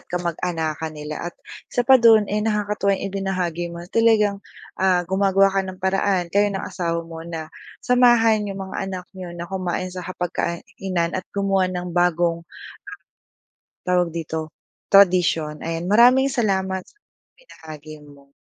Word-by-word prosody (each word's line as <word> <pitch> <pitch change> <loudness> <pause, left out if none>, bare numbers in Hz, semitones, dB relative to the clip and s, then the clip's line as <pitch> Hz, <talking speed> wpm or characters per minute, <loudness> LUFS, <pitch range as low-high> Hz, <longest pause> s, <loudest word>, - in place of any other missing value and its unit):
at - - -25
kamag-anakan 165 -2 -3
nila 150 +3 -5
at - - -31 0.4
isa 245 - 0
pa 265 -1 +7
dun 225 -2 +6
eh 210 - +1
nakakatuwa 210 -2 0
yung - - -6
ibinahagi 185 -3 -2
mo 170 0 -8
talagang 215 -3 +3 0.4
ah 180 -2 +3
gumagawa 195 +1 +3
ka 195 - +2
ng 185 -1 -7
paraan 190 -1 +1
kayo 205 +1 +3
ng 195 -1 -4
asawa 170 -2 -3
mo 165 -1 -9
na 160 -1 -6 0.3
samahan 240 -3 +4
yung 195 -1 -6
mga - - -4
anak 180 -2 -6
niyo 180 -2 -8
na 170 - -5
kumain 185 -1 -3
sa 185 - -5
hapag-kainan 175 0 -3
at 185 - -2
gumawa 195 -2 +1
ng 180 -1 -5
bagong, 175 -1 +1 1.4
tawag 180 -2 +1
dito 160 -1 -4 0.4
tradisyon. 175 -6 +4
Ayan, 165 +2 -3
maraming 250 +5 +5
salamat 190 -6 -1
sa - - -24 0.4
ibinahagi 155 - -12
mo. 140 -1 -18
185 Hz, 145 wpm, -22 LUFS, 170-200 Hz, 1.4 s, pa